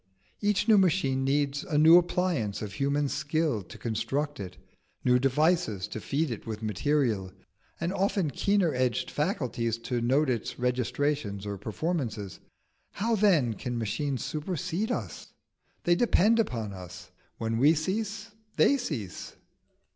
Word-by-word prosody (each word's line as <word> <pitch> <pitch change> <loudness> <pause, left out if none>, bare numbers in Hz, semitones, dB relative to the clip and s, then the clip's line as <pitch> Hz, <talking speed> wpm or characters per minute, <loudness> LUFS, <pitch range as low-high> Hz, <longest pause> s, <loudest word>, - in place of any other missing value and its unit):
Each 205 0 +1
new 215 -3 +7
machine 150 -8 +2
needs 140 +1 0
a 170 -7 -1
new 160 +3 +8
appliance 170 - -1
of 105 - -6
human 140 +1 0
skill 150 -5 -1
to 90 - -12
construct 140 +6 -2
it, 95 -2 -7 0.5
new 125 0 +5
devices 135 - +1
to 110 - -6
feed 145 +4 -1
it 115 - -6
with 110 0 -5
material, 110 -3 0 0.5
and 170 +3 -1
often 195 -5 0
keener 195 +1 +1
edged 125 -2 0
faculties 125 - -1
to 115 +1 -3
note 135 +6 +2
its 120 -4 -2
registrations 125 -3 -1
or 100 -1 -3
performances. 110 - -3 0.5
How 225 +3 0
then 175 - +3
can 120 +3 -4
machines 130 +5 -2
supersede 180 +5 -2
us? - - -5 0.5
they 175 - +4
depend 225 +2 +3
upon 115 - -1
us. 90 -1 -10 0.3
When 115 0 -1
we 150 +5 +5
cease, 210 +6 -3 0.2
they 280 - +4
cease." 135 - -5
140 Hz, 140 wpm, -28 LUFS, 115-175 Hz, 0.5 s, new